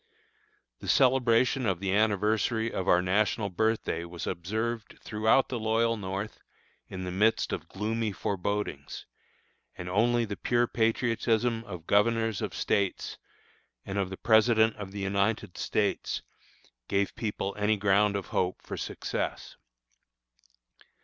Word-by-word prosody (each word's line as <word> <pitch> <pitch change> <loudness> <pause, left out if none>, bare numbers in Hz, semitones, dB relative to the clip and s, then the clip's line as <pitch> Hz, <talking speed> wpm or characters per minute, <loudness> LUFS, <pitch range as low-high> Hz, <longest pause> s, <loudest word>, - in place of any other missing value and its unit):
The - - -9
celebration 130 -1 +3
of 95 -3 0
the 95 0 -1
anniversary 110 +2 +1
of 95 - -3
our 90 +1 +4
national 100 +2 +1
birthday 110 -4 0
was 85 0 -7
observed 110 +6 -3
throughout 110 +4 +2
the 120 - -2
loyal 115 +1 +2
North 100 +1 -5 0.5
in 95 0 -6
the 90 - -4
midst 105 +5 +2
of - - -4
gloomy 110 +2 -2
forebodings, 100 -7 -3 0.7
and 90 - -6
only 115 +5 +2
the 100 -2 -5
pure 120 +4 +1
patriotism 115 0 +1
of 90 -6 -8
governors 110 +1 +2
of - - -3
States, 100 -2 -1 0.7
and 100 +1 -3
of 95 -2 -1
the 95 - -6
President 110 0 +4
of 100 -2 -7
the 100 0 -6
United 100 0 0
States, - - -1 0.6
gave 100 0 +1
the - - -22
people 105 -3 -2
any 105 +1 +1
ground 100 +1 +3
of 100 - -4
hope 90 0 0
for - - -6
success. - - -4
105 Hz, 135 wpm, -29 LUFS, 95-115 Hz, 0.7 s, our